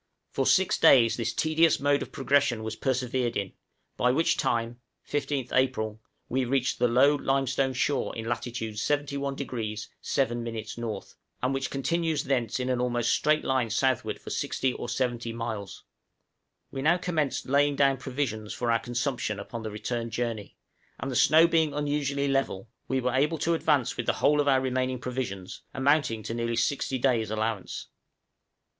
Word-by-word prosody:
For - - 0
six 190 -1 +3
days 125 -8 +6
this 115 - -1
tedious 160 +1 +3
mode 145 0 +2
of - - -6
progression 135 -4 +1
was 110 0 -4
persevered 125 -2 -1
in, 100 -2 -3 0.4
by 125 - +3
which 160 +6 +2
time 115 +1 -1 0.3
(15th 140 -3 -2
April) 110 -5 0 0.3
we 130 +1 0
reached 130 +1 0
the 125 - +4
low 130 +5 +5
limestone 135 -1 0
shore 140 +3 0
in 110 - -5
latitude 115 -1 -3
71° 140 -5 -2
7' 120 -3 -1
N., 115 -1 -4 0.8
and 130 +2 +1
which 135 0 -2
continues 155 +2 0
thence 125 -4 0
in 130 0 -1
almost 120 -1 0
a - - +4
straight 155 +1 +2
line 130 -3 +1
southward 130 +1 0
for - - -9
60 130 -1 -1
or 120 - -6
70 120 -2 -1
miles. 110 -4 -5 0.9
We 135 - -4
now 160 +5 +4
commenced 165 -6 -1
laying 145 +2 +3
down 135 -1 +3
provisions 125 -6 -3
for 120 -1 0
our 115 - +3
consumption 120 -3 -2
upon 115 +3 -6
the 110 - -4
return 115 +2 -3
journey; 115 -3 -4 0.4
and 135 +3 -3
the - - -4
snow 160 +6 +6
being 160 -3 +2
unusually 145 -1 0
level, 135 -6 -1 0.2
we 130 - 0
were 125 -1 -1
able 150 +5 +2
to 165 +3 +1
advance 145 -6 +1
with - - -3
the - - +3
whole 150 +1 +3
of 145 - -2
our 135 -2 +4
remaining 130 0 -1
provisions, 120 -7 -5
amounting 135 -5 +2
to 110 - -4
nearly 115 0 -1
sixty 135 +2 0
days' 120 -4 +1
allowance. 110 -2 -3
130 Hz, 165 wpm, -27 LUFS, 115-140 Hz, 0.9 s, days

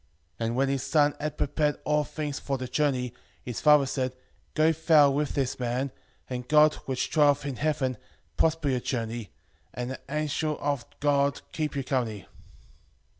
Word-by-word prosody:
And 115 0 -1
when 135 +2 +2
his 135 -1 0
son 145 +1 +3
had 150 0 -3
prepared 150 +1 0
all 150 0 +2
things 145 -1 -4
far 135 -1 -2
the 130 0 -5
journey, 125 -3 0 0.3
his 120 -3 -5
father 150 -2 +6
said, 130 -1 -2 0.4
Go 155 +1 +4
thou 155 -3 +5
with 145 +1 -1
this 135 -2 -1
man, 125 +2 -1 0.4
and 125 -1 -5
God, 150 0 +6
which 130 -1 -2
dwelleth 145 -2 +4
in 135 -3 -4
heaven, 145 -5 0 0.4
prosper 160 -2 +1
your 130 -2 +1
journey, 115 -3 -3 0.5
and 125 +1 -3
the 130 - -6
angel 150 +1 -1
of 145 -3 -1 0.2
God 140 -1 +2
keep 155 -2 -2
you 140 - -1
company. 115 -7 -2
140 Hz, 165 wpm, -27 LUFS, 125-150 Hz, 0.5 s, father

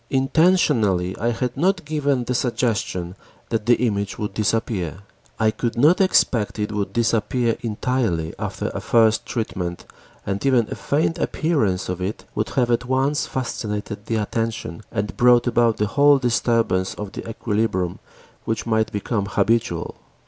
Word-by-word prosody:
Intentionally 130 - +2
I 115 - +1
had 120 +1 -2
not 180 +4 +1
given 145 -4 0
the 125 - -2
suggestion 110 -8 -1 0.3
that 115 -1 -2
the 120 - +6
image 100 -5 -1
would 105 -2 -4
disappear. 100 -5 -1 0.4
I 110 -1 +3
could 115 +2 -3
not 155 +10 +5
expect 120 - +2
it 105 0 -2
would 105 -1 -2
disappear 115 +1 +1
entirely 110 -8 -1
after - - -3
a - - -4
first 110 -2 +3
treatment 90 -6 -3 0.4
and 100 0 -2
even 125 -5 +3
a - - -2
faint 155 +3 0
appearance 110 - 0
of 90 0 -4
it 95 +4 -4
would 105 - -2
have 120 -2 +3
at 120 +1 +1
once 135 +3 +1
fascinated 105 -4 -4
the 115 - 0
attention 110 -4 -3
and 105 -2 -3
brought 120 0 +5
about 120 -2 +2
the 105 - +1
whole 145 +6 +5
disturbance 115 -6 +1
of 105 -2 -6
the - - -7
equilibrium 105 -6 -1 0.5
which 115 -1 -2
might 110 -1 +1
become 100 0 -2
habitual. 105 -3 0
115 Hz, 150 wpm, -22 LUFS, 105-125 Hz, 0.5 s, the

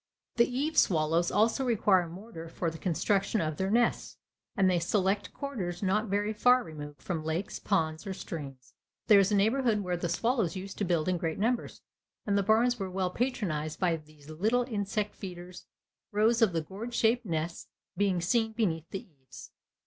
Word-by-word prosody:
The 235 +1 +4
eave 285 +6 +1
swallows 165 0 +2
also 225 +5 +2
require 195 -7 +3
mortar 170 -2 -9
for 165 0 -2
the 160 - -10
construction 195 +4 +1
of 155 -3 -2
their 190 0 -1
nests, 235 +3 +1 0.4
and 195 -1 +4
they 180 -2 +3
select 195 +3 0
quarters 200 -11 -5
not 210 +4 +1
very 205 +2 0
far 250 +4 +4
removed 150 -4 -9
from 165 -4 -3
lakes, 160 +5 -3
ponds, 160 -2 -1
or 195 - -2
streams. 135 -8 -8 0.3
There 210 -2 +7
is 195 +1 +3
a - - +3
neighborhood 220 +1 +2
where 180 -2 -1
the 175 0 -3
swallows 220 -1 0
used 190 +1 -7
to 205 - +1
build 170 -3 +1
in 180 -1 +1
great 160 -1 -2
numbers, 235 +4 -1 0.4
and 200 - +1
the 200 - +3
barns 225 +4 +3
were 190 -1 -3
well 185 -1 -1
patronized 180 - -2
by 175 -3 +2
these 155 -2 -14
little 215 +11 +1
insect 210 -3 -2
feeders, 180 -2 -9 0.4
rows 225 +3 +3
of 220 -4 +5
the 165 -1 -1
gourd 210 +9 -7
shaped 235 +2 +3
nests 165 0 -3 0.3
being 195 -3 +1
seen 225 +5 +1
beneath 170 -8 -1
the 195 - -5
eaves. 135 -7 -14
190 Hz, 180 wpm, -30 LUFS, 165-220 Hz, 0.4 s, There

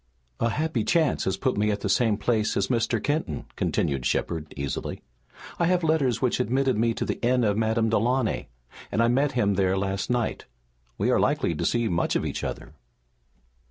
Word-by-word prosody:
"A 115 - +2
happy 150 -2 -1
chance 160 +1 +1
has 95 0 0
put 130 +2 0
me 105 +1 +2
at 105 -1 -1
the - - -2
same 105 +1 +2
place 110 0 0
as 100 0 0
Mr. 115 -1 +1
Kenton," 145 - -2
continued 70 -3 -1
Shepard 80 +4 -1
easily. 70 -1 -4 0.6
"I 170 - +3
have 180 -1 +2
letters 145 -7 +2
which 125 - +1
admitted 130 +2 +1
me 115 +1 +1
to - - -2
the - - -3
inn 125 +1 +3
of 105 -2 +2
Madame 110 +1 +1
Delaunay, 115 +2 +1 0.4
and 115 - +2
I - - +4
met 135 +3 +2
him 105 -5 +2
there 95 0 +1
last 95 +1 -2
night. 120 -2 -1 0.5
We - - +1
are - - +3
likely - - +1
to - - -3
see 120 -1 +1
much 85 -4 0
of - - 0
each - - -4
other." - - -5
115 Hz, 195 wpm, -26 LUFS, 100-130 Hz, 0.6 s, I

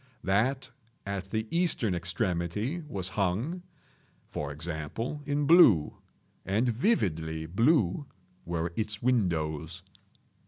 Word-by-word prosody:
That 120 +8 +1 0.3
at 100 -1 -3
the 110 +1 -1
eastern 165 - +1
extremity 90 - -2
was 95 -8 -3
hung, 105 - -1 0.6
for 75 -1 -5
example, 85 - -4
in 145 0 +1
blue—and 110 - +3
vividly 80 - 0
blue 115 - +2 0.4
were 85 0 -2
its 105 -1 -3
windows. 85 - 0
100 Hz, 90 wpm, -29 LUFS, 85-125 Hz, 0.6 s, blue—and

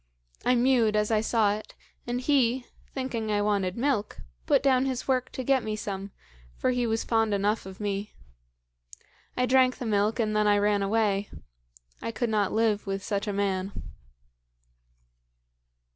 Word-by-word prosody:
"I 250 - +3
mewed 240 -3 +3
as 210 +1 +1
I 215 -1 +3
saw 220 -2 +2
it, 215 +1 -8 0.3
and 240 +1 -1
he, 255 -2 +2 0.3
thinking 235 -5 -3
I 205 0 +1
wanted 200 -2 0
milk, 240 -5 0 0.3
put - - +3
down 265 -1 +3
his 255 -2 -3
work 255 -2 0
to 260 - -4
get 265 0 +3
me 215 -1 -2
some, 200 -2 -5 0.5
for 255 - +1
he 245 -1 0
was 225 0 0
fond 225 -2 +1
enough 205 +1 0
of 190 0 -10
me. 205 0 -3 1.2
I 250 - +3
drank 255 0 +4
the 255 - -5
milk, 210 +1 +1
and 215 -2 0
then 210 0 +3
I 205 0 +4
ran 205 0 +2
away. 200 -1 +1 0.7
I 230 - -3
could 230 0 -2
not 205 -3 +1
live 220 -2 +1
with 195 0 -3
such 200 +1 -2
a - - 0
man. 195 -1 -2
215 Hz, 165 wpm, -27 LUFS, 205-245 Hz, 1.2 s, drank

